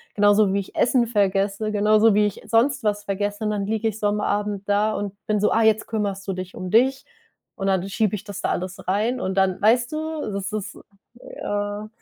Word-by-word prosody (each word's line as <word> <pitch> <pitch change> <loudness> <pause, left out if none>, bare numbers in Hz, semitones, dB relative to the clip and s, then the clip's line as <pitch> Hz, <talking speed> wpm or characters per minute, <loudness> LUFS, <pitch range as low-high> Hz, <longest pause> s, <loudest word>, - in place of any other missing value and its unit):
genauso 205 -1 +4
wie 200 - +1
ich 195 - -8
Essen 245 -1 +3
vergesse, 200 0 0
genauso 215 +1 +4
wie 210 +1 +4
ich 205 - -7
sonst 255 +3 +2
was 205 -1 0
vergesse 205 +2 -2
und - - +1
dann 205 -2 -1
liege 220 +1 -1
ich 215 -2 -3
so 210 - +1
am 210 0 0
Abend 205 -1 -2
da 210 +2 +2
und 200 -1 -4
bin 215 -1 0
so: 210 - +3
„Ah, 225 - +3
jetzt 220 0 +3
kümmerst 200 -3 -3
du 195 - -1
dich 185 0 -7
um 185 - -5
dich.“ 260 +5 +3 0.5
Und 195 - -3
dann 190 -1 +1
schiebe 210 +1 0
ich 205 - -7
das 205 -2 -7
da - - -1
alles 185 +1 -4
rein 220 +7 0
und 190 0 -2
dann, 190 -1 +1
weißt 240 +3 +3
du, 315 0 -3
das 200 0 -4
ist, 210 -1 -5 0.4
äh 205 -2 -4
205 Hz, 220 wpm, -23 LUFS, 200-220 Hz, 0.5 s, genauso